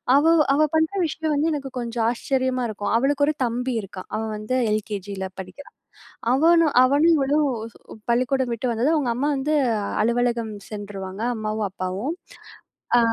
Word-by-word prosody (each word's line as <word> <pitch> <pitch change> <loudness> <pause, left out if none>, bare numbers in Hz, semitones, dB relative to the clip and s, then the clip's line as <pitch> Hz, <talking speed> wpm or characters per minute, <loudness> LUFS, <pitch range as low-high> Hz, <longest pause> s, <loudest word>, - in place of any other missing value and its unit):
அவ 285 +2 +4 0.3
அவ 290 - +2
பண்ற 320 0 +2
விஷயம் 315 0 -2
வந்து 310 +3 +1
எனக்கு 275 -2 -4
கொஞ்சம் 235 -1 -2
ஆச்சரியமா 255 +1 -1
இருக்கும். 205 -1 -3
அவளுக்கு 285 +3 +2
ஒரு 305 - +2
தம்பி 245 +2 -2
இருக்கான். 190 -1 -9
அவன் 220 0 -3
வந்து 215 +4 -3 0.2
எல்கேஜில 200 -2 -3
படிக்கிறான். 190 +9 -10 0.6
அவனும் 325 +2 +4
அவனும் 290 +6 +4
இவளும் 290 +1 +2 0.6
பள்ளிக்கூடம் 255 +1 +1
விட்டு 230 +3 -4
வந்ததும், 255 +8 +1
அவங்க 255 -6 0
அம்மா 280 +4 0
வந்து 295 +3 0 0.5
அலுவலகம் 235 -1 0 0.2
சென்றுருவாங்க 200 -1 -6
அம்மாவும் 215 -1 -2
அப்பாவும். 190 - -3 0.9
அ - - +6
245 Hz, 140 wpm, -23 LUFS, 215-285 Hz, 0.9 s, அ